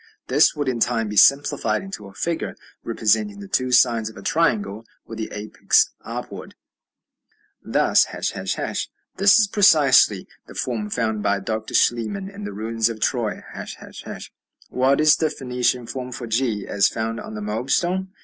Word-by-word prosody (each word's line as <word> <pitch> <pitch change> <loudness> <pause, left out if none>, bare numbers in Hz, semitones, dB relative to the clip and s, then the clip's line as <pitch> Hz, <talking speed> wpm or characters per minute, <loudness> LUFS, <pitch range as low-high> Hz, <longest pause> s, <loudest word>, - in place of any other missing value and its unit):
This - - +4
would 145 -2 -2
in 125 -2 -1
time 115 -2 0
be 105 - -5
simplified 140 - +3
into 195 - -8
a 95 - -14
figure 170 +7 -3 0.3
representing 200 - 0
the 200 - -9
two 130 -9 0
sides 120 -3 +3
of 110 - -14
a 100 - -10
triangle 110 -10 0 0.2
with 115 -1 -9
the 110 - -4
apex 105 0 +1
upward, - - -7 1.1
thus, - - +3
###. - - -4 0.8
This 195 0 +6
is 220 - +5
precisely 145 - +4 0.2
the - - -13
form 110 -5 -3
found 110 -1 -1
by 100 -1 +1
Dr. 110 +3 -4
Schliemann 190 - +1
in 205 +1 -8
the - - -5
ruins 115 +1 -1
of 115 -1 -6
Troy, - - -1 0.6
###. - - -12
What 130 +2 +2
is 155 0 +5
the 160 - +1
Phoenician 125 -2 -1
form 125 +1 -6
for 120 0 -6
g 115 -3 -1
as 100 -1 +3
found 115 0 -3
on 110 - -8
the 105 - -5
Moab 110 +5 -4
stone? 185 +5 0
120 Hz, 165 wpm, -22 LUFS, 110-150 Hz, 1.1 s, This